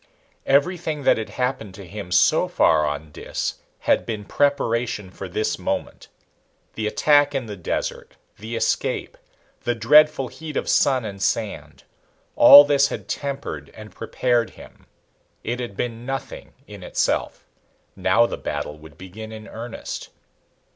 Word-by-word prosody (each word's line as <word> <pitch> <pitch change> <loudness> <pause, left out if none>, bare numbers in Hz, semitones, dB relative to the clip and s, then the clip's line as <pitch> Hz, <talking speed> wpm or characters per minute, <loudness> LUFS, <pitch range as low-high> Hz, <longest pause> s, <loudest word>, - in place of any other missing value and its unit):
Everything 155 +1 +1
that - - +4
had 110 - -5
happened 125 -6 -3
to 100 - -10
him 100 -2 -8
so - - +4
far 75 -2 +3
on 75 +1 -5
Dis - - -4 0.2
had - - +2
been 105 -3 -5
preparation 115 -7 0
for 95 0 -8
this 110 +5 -1
moment. - - -4 0.7
The 110 -1 -2
attack 145 +4 +3
in 130 -3 -1
the 105 -2 -7
desert, 90 - -4 0.2
the 110 +3 -6
escape, - - -1 0.5
the 120 - 0
dreadful 145 +3 +5
heat 155 -3 -7
of - - -2
sun 130 -4 +2
and 100 -2 -7
sand. 110 +1 -2 0.5
All 145 +1 +11
this 140 -1 +3
had - - -7
tempered 135 - -5
and 110 -3 -11
prepared 120 +1 0
him. - - -16 0.6
It 120 +2 -3
had 120 -6 -6
been 115 -1 -3
nothing 135 +1 -6
in 105 -2 -11
itself. - - -1 0.5
Now 120 - +3
the - - -4
battle 75 +1 -5
would 75 -2 -15
begin 105 +4 -9
in 110 0 -9
earnest. 115 +1 -7
115 Hz, 145 wpm, -23 LUFS, 100-135 Hz, 0.7 s, All